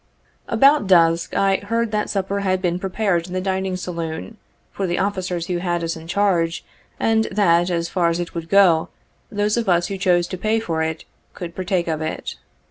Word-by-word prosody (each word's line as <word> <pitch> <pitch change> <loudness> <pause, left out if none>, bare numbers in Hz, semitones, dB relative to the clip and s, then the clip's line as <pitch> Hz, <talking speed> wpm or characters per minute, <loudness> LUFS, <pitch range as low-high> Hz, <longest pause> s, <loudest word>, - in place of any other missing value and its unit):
About 275 -5 +4
dusk 165 -2 +3
I 195 -1 +3
heard 230 +2 -2
that 210 -1 -1
supper 195 0 -1
had 185 -2 0
been 180 -1 -1
prepared 190 -2 -1
in 180 - -8
the 185 - 0
dining 190 0 -1
saloon, 170 +3 -5 0.3
for 195 - -3
the 175 - -1
officers 185 -4 -2
who 180 0 -2
had 175 -1 -1
us 165 0 -2
in 160 0 -10
charge, 175 -3 +1 0.3
and 220 0 +2
that, 175 -3 +2
as 170 -1 -1
far 170 -1 +1
as 170 +1 -1
it 175 - -4
would 165 -1 -6
go, 185 -5 +4 0.4
those 210 +1 0
of 230 -4 0
us 175 -1 +2
who 195 -1 -4
chose 175 -2 +3
to 185 - -5
pay 220 +3 +1
for 165 -7 -2
it, 160 0 -3 0.3
could 170 -2 -6
partake 185 -1 -1
of 160 -1 -2
it. 155 - -4
185 Hz, 200 wpm, -21 LUFS, 170-200 Hz, 0.4 s, About